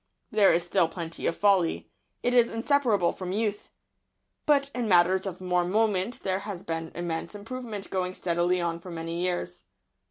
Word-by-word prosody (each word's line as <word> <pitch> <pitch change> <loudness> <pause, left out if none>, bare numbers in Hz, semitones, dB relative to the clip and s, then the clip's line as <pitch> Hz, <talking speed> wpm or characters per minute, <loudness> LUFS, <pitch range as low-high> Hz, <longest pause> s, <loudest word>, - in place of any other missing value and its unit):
There 205 -2 +5
is 170 +1 +2
still 170 -1 +2
plenty 165 -1 -5
of 165 - 0
folly. 195 -5 +2 0.3
It 245 - +1
is 240 -1 +5
inseparable 230 -6 +2
from 185 -1 -5
youth. 210 0 -2 0.8
But 280 -2 +3
in 245 -2 -2
matters 185 +1 +4
of 185 -2 -5
more 180 -1 +1
moment 205 +3 0
there 190 0 0
has 195 -3 -6
been 165 0 -4
immense 170 +2 -3
improvement 220 -1 -6
going 185 -1 -1
steadily 175 +1 +1
on 170 -1 -1
for 180 - -11
many 165 0 -4
years. 95 - -2
185 Hz, 165 wpm, -27 LUFS, 170-210 Hz, 0.8 s, There